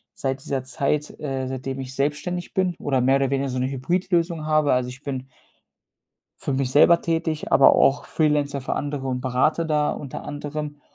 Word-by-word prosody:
seit 135 Hz, -1 st, -3 dB
dieser 135 Hz, -2 st, -2 dB
Zeit, 145 Hz, +3 st, -1 dB
äh, 135 Hz, -3 st, -3 dB
seitdem 130 Hz, +1 st, -4 dB
ich 130 Hz, 0 st, -6 dB
selbstständig 150 Hz, +6 st, -2 dB
bin 185 Hz, -2 st, +1 dB
oder 135 Hz, -3 st, 0 dB
mehr 135 Hz, +2 st, +4 dB
oder 135 Hz, -1 st, +1 dB
weniger 140 Hz, 0 st, 0 dB
so 130 Hz, 0 st, -2 dB
'ne 130 Hz, -, 0 dB
Hybridlösung 170 Hz, +3 st, 0 dB
habe. 155 Hz, -1 st, +3 dB
Also, 125 Hz, 0 st, 0 dB
ich 135 Hz, +3 st, -11 dB
bin 130 Hz, -2 st, -4 dB, 1.2 s
für 140 Hz, -, -1 dB
mich 130 Hz, -1 st, 0 dB
selber 170 Hz, +4 st, +6 dB
tätig, 165 Hz, -2 st, -1 dB
aber 135 Hz, -, +7 dB
auch 135 Hz, +1 st, +3 dB
Freelancer 145 Hz, -3 st, +1 dB
für 130 Hz, -, -2 dB
andere 145 Hz, -2 st, -3 dB
und 125 Hz, -1 st, -2 dB
berate 130 Hz, +6 st, +1 dB
da 150 Hz, -1 st, +1 dB
unter 140 Hz, -3 st, -6 dB
anderem. 145 Hz, 0 st, -5 dB
140 Hz, 180 wpm, -23 LUFS, 130-150 Hz, 1.2 s, aber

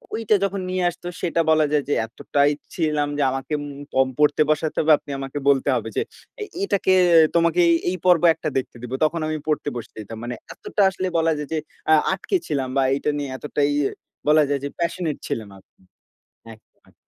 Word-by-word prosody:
ঐটা 220 Hz, -1 st, +2 dB
যখন 195 Hz, 0 st, -1 dB
নিয়ে 185 Hz, 0 st, -1 dB
আসতো 175 Hz, +1 st, -9 dB
সেটা 170 Hz, -1 st, +1 dB
বলা 155 Hz, -1 st, +4 dB
যায় 150 Hz, -2 st, +2 dB
যে, -, -, +2 dB
এতটাই 140 Hz, +5 st, +1 dB, 0.2 s
ছিলাম 150 Hz, -3 st, 0 dB
যে 145 Hz, -, +2 dB
আমাকে 135 Hz, +3 st, -4 dB
উম 145 Hz, 0 st, -8 dB
পম 130 Hz, 0 st, +3 dB
পড়তে 150 Hz, 0 st, +3 dB
বসাতে 155 Hz, 0 st, 0 dB
হবে, 155 Hz, 0 st, +3 dB
আপনি 145 Hz, -, -11 dB
আমাকে 135 Hz, +1 st, -6 dB
বলতে 140 Hz, 0 st, +3 dB
হবে 115 Hz, -1 st, -3 dB
যে, -, -, +3 dB, 0.4 s
এ -, -, -1 dB, 0.2 s
এটাকে 195 Hz, -, +2 dB, 0.4 s
"তোমাকে 170 Hz, +1 st, +3 dB, 0.3 s
এই 185 Hz, -, -2 dB
পর্ব 180 Hz, -3 st, +5 dB
একটা 155 Hz, -, -4 dB
দেখতে 130 Hz, -, -3 dB
দিবো।" 125 Hz, +1 st, -4 dB
তখন 165 Hz, +2 st, +1 dB
আমি 155 Hz, -, -2 dB
পড়তে 150 Hz, -1 st, 0 dB
বসতে 115 Hz, -, -9 dB
দিতাম। 110 Hz, +2 st, -9 dB
মানে 120 Hz, 0 st, -4 dB, 0.2 s
এতটা -, -, -3 dB
আসলে 185 Hz, 0 st, -3 dB
বলা 165 Hz, 0 st, +2 dB
যায় 150 Hz, -1 st, -5 dB
যে -, -, 0 dB, 0.3 s
আ -, -, +8 dB, 0.2 s
আটকে 195 Hz, -, -2 dB
ছিলাম 135 Hz, -4 st, -1 dB
বা, 135 Hz, -, +4 dB
এইটা 140 Hz, +2 st, -1 dB
নিয়ে 145 Hz, -1 st, -3 dB
এতটাই 145 Hz, 0 st, -1 dB, 0.6 s
বলা 155 Hz, 0 st, +6 dB
যায় 140 Hz, -, 0 dB
যে 140 Hz, -, -2 dB
passionate 170 Hz, -2 st, -2 dB
ছিলাম 110 Hz, -3 st, -4 dB
আমি। 95 Hz, -, -19 dB, 0.9 s
একদম। 110 Hz, -, -24 dB
150 Hz, 195 wpm, -22 LUFS, 140-170 Hz, 0.9 s, আ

